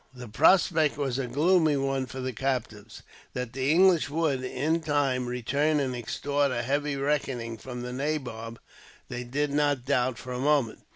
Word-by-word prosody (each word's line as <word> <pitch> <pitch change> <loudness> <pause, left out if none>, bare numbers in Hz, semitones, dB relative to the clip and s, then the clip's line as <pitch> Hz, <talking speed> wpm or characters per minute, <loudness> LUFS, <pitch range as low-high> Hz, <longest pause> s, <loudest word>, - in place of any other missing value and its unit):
The 125 -1 -9
prospect 155 - +3
was 135 -3 -1
a 130 - -2
gloomy 155 +3 +3
one 135 -1 -1
for 130 0 -7
the 130 0 -3
captives. 110 -4 -4 0.3
That 125 -1 -4
the 135 +1 -1
English 175 -1 +4
would, 145 -4 0
in 150 +6 -1
time, 140 -5 0
return 140 +5 0
and 130 -3 -1
extort 140 +4 -1
a 120 -1 -1
heavy 145 +3 -1
reckoning 135 -5 -1
from 125 +1 -7
the 125 0 -5
nabob, 125 -5 -3 0.5
they 125 0 -4
did 140 +4 -1
not 145 -3 +1
doubt 130 -3 +1
for 125 +1 -7
a 125 - -4
moment. 140 -4 +1
135 Hz, 170 wpm, -27 LUFS, 125-145 Hz, 0.5 s, English